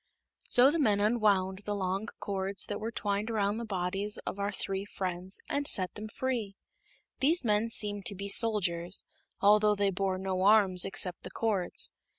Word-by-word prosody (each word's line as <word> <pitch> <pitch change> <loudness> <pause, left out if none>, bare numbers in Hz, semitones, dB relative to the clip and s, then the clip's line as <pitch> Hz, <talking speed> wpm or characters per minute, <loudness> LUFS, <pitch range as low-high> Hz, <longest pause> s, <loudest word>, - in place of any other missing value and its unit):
So 255 +3 +5
the 335 - -1
men 210 -8 +2
unwound 205 -3 +1
the 205 - -2
long 195 +2 -2
cords 195 0 -2
that 205 - -5
were 220 - -4
twined 205 -1 -2
around 210 -1 0
the 235 - -5
bodies 195 +1 -2
of 200 - -5
our 200 +1 -1
three 195 0 -4
friends, 185 -2 -3
and 285 0 -2
set 185 -2 +1
them 210 +1 -7
free. 225 -3 -3 0.6
These 310 +2 +4
men 210 +1 +1
seemed 205 -3 0
to 200 - -4
be 200 +1 -6
soldiers, 190 -5 +1 0.4
although 210 +1 +4
they 200 -1 +1
bore 190 0 -1
no 190 -1 -3
arms 195 -3 +5
except 195 -2 -2
the - - -8
cords. 205 -6 +1
200 Hz, 170 wpm, -30 LUFS, 190-215 Hz, 0.6 s, So